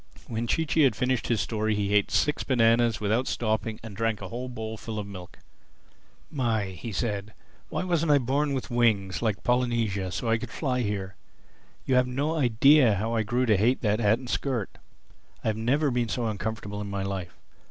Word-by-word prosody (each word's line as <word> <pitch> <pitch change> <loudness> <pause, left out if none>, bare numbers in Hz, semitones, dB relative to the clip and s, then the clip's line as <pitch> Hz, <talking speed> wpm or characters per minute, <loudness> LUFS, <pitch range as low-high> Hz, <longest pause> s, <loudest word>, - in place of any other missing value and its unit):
When 115 +1 -3
Chee 160 +7 +1
Chee 160 - +2
had 130 -7 +4
finished 125 +2 0
his 115 -3 +1
story 110 -1 -1
he 100 0 -1
ate 105 -1 +3
six 150 - +1
bananas 115 -2 +3
without 110 +5 0
stopping 110 -1 -1
and 110 -3 -8
drank 115 0 0
a 95 - -7
whole 125 +2 -5
bowlful 110 -2 -6
of 105 - -3
milk. 90 -3 -10 0.9
"My!" 115 -8 0
he 95 +5 -7
said, 105 0 -3 0.3
"why - - -2
wasn't 170 -3 +1
I 145 - +6
born 140 +3 0
with 130 -1 -4
wings, 110 -6 +1
like 110 -4 -1
Polynesia, 115 -6 0
so 115 - -3
I 115 0 +2
could 120 - -6
fly 125 -1 -1
here? 100 -3 -3 0.7
You've 125 -1 +3
no 140 +6 -1
idea 130 -2 +5
how 110 +4 -2
I 115 - +2
grew 120 +4 0
to 110 -3 +4
hate 115 +7 +2
that 105 -1 +1
hat 110 0 +3
and 125 0 -10
skirt. 120 -4 -2 0.7
I've 110 - 0
never 135 +6 +1
been 120 -2 0
so 120 +1 -1
uncomfortable 105 -1 -4
in 100 - -5
my 100 -1 -3
life. 95 -3 -5
115 Hz, 190 wpm, -27 LUFS, 105-125 Hz, 0.9 s, I